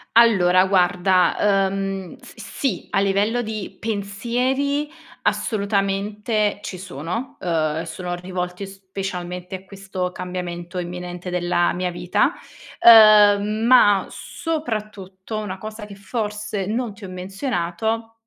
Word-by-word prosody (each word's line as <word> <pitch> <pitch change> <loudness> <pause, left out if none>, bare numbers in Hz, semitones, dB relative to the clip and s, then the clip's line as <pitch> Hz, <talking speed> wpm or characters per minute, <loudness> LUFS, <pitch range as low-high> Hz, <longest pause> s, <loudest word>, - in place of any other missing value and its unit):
Allora, 190 -6 +5
guarda, 190 +1 +3
uhm, 195 -1 -4
s - - -14
sì. 270 - -3
A 195 - +1
livello 205 +5 +1
di 215 -3 -6
pensieri, 245 +8 -1 0.3
assolutamente 205 0 0
ci 185 - -6
sono, 180 - -5
uhm, 180 - -4 0.3
e - - -6
sono 180 -1 -5
rivolti 180 +1 -5
specialmente 190 -2 -6
a 190 0 -10
questo 190 -2 -5
cambiamento 180 0 -5
imminente 180 0 -6
della 175 -1 +1
mia 180 +1 -2
vita. 175 +1 +1 0.5
Uhm, 210 -3 +8 0.2
ma 205 -6 +6
soprattutto 215 - -5
una 190 -3 -5
cosa 215 +1 -7
che 205 - -11
forse 210 -1 -3
non 225 +1 -2
ti 205 - -15
ho - - -8
menzionato, 195 +3 -3
195 Hz, 115 wpm, -22 LUFS, 180-215 Hz, 0.5 s, Uhm